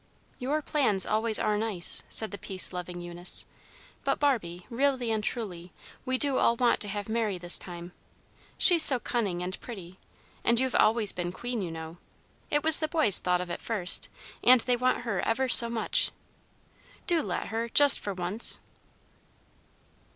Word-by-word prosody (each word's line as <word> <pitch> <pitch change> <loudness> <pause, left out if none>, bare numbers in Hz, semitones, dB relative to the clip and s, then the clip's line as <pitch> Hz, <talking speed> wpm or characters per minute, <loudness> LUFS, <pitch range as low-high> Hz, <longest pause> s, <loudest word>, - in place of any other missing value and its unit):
"Your 290 +5 -3
plans 230 -12 0
always 220 0 -1
are 210 -1 -2
nice," 210 -6 -1
said 220 - +3
the 200 - -9
peace 185 -1 -1
loving 180 0 -8
Eunice; 175 +1 -4 0.6
"but, - - -2
Barbie, 185 -12 -2
really 255 -1 -2
and 215 -1 -3
truly, 180 -8 -5 0.3
we 260 -1 -2
do 275 -1 +2
all 235 - +1
want 240 0 0
to 210 - +4
have 205 0 -6
Mary 220 -3 -3
this 175 0 0
time. 175 -1 -11 0.7
She's 350 -3 +5
so 275 -4 +8
cunning 200 -8 -4
and 185 +2 -6
pretty, 185 -6 -12 0.4
and 235 0 +1
you've 260 -1 -2
always 220 -2 +2
been 175 -1 -6
queen, 240 +4 -6
you 180 - -5
know. 160 +1 -10 0.5
It 295 0 -1
was 320 0 +7
the 310 - -2
boys 305 - +1
thought 180 0 -1
of 180 -1 -8
it - - -7
first, 205 -6 +2 0.3
and 250 -1 +5
they 250 +1 -1
want 250 +1 -1
her 230 -6 -4
ever 260 +4 -2
so 235 -1 +8
much. 230 -1 0 1.0
Do 340 -4 +2
let 180 -8 -6
her, 230 +1 -5
just 285 +4 +7
for 200 -2 -7
once." 185 +5 +1
220 Hz, 170 wpm, -26 LUFS, 180-250 Hz, 1.0 s, so